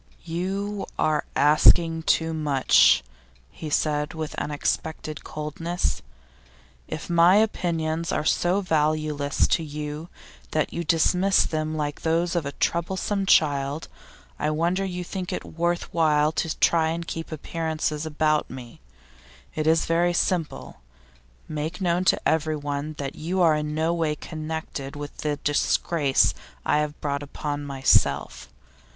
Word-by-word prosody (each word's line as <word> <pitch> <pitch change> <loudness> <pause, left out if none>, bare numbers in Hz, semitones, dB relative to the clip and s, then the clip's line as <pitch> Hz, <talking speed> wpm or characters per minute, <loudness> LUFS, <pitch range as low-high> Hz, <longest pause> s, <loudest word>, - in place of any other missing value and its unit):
'You 195 +4 -3
are 155 -1 +1
asking 165 +3 +5
too 160 0 +1
much,' 145 - +4 0.5
he 155 - -7
said, 150 0 0
with 155 -1 -4
unexpected 155 +1 -3
coldness. 155 - -3 0.9
'If 155 - -6
my 170 +2 +5
opinions 170 -6 0
are 150 - -1
so 180 +5 +2
valueless 155 -4 +1
to 165 - +2
you 150 +2 -6 0.4
that - - 0
you 170 - -2
dismiss 180 +4 +3
them 155 0 -2
like 145 -1 -3
those 165 +2 0
of 165 -4 0
a - - -3
troublesome 190 +3 -1
child, 145 -2 +2 0.5
I 150 - 0
wonder 170 +5 0
you 180 -2 -3
think 180 0 -5
it - - -4
worth 170 +1 -2
while 155 -2 +3
to 160 0 -2
try 165 -2 +4
and 170 +1 -3
keep 165 -1 -5
up - - -8
appearances 155 -1 -2
about 155 -1 0
me. 125 - -10 0.7
It 155 0 -2
is 160 0 +3
very 170 +1 +2
simple: 170 - -2 0.7
make 155 +3 -4
known 180 -1 +1
to - - +2
everyone 150 -1 -1
that 140 -1 -4
you 175 +4 -3
are 165 -2 +5
in 150 0 -3
no 160 +2 +1
way 160 -3 0
connected 155 -3 -6
with 145 0 -7
the 150 -1 -1
disgrace 145 0 +2 0.3
I 150 - +3
have 150 0 -3
brought 140 -1 -2
upon 145 0 -4
myself. 70 - +1
155 Hz, 135 wpm, -25 LUFS, 150-170 Hz, 0.9 s, asking